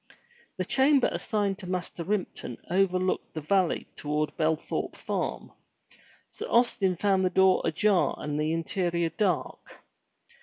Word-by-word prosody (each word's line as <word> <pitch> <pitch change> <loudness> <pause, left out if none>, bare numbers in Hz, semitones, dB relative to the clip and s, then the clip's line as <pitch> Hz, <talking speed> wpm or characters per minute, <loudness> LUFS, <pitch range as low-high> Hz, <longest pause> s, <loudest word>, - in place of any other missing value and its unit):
The - - -1
chamber 270 0 +4
assigned 205 -3 -1
to 185 - -8
Master 180 -2 -3
Ripton 185 - -3
overlooked 185 -1 +1
the 155 - -3
valley 185 +3 +1
toward 150 +1 -2
Belthorpe 155 0 -1
farm. - - -3 0.8
Sir - - -6
Austin 230 -6 +2
found 190 +1 +2
the 185 - +3
door 190 +1 +4
ajar 185 +4 +2
and 150 0 -3
the 155 +1 0
interior 170 0 -1
dark. 180 0 -2
185 Hz, 125 wpm, -28 LUFS, 165-200 Hz, 0.8 s, chamber